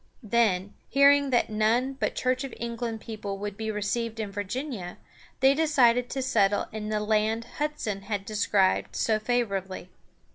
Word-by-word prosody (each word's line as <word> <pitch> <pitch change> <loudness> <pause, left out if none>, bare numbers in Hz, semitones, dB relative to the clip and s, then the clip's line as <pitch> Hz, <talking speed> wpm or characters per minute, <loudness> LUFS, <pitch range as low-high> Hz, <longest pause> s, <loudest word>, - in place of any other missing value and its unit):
Then, 210 -4 +1 0.2
hearing 280 0 +5
that 240 -3 +1
none 230 +5 +1
but 270 - -2
Church 255 +1 0
of 270 - -6
England 230 -1 -4
people 210 -3 -5
would 205 0 -5
be 220 +1 -4
received 220 +2 -2
in 210 -2 -3
Virginia, 205 -1 -5 0.4
they 265 +1 +6
decided 255 -6 +3
to 265 0 -2
settle 205 -5 +2
in 215 -1 -5
the 215 0 0
land 215 +2 +1
Hudson 295 -10 -2
had 200 -1 -4
described 205 -2 +1
so 220 -1 +1
favorably. 200 -6 -2
220 Hz, 150 wpm, -27 LUFS, 205-250 Hz, 0.4 s, they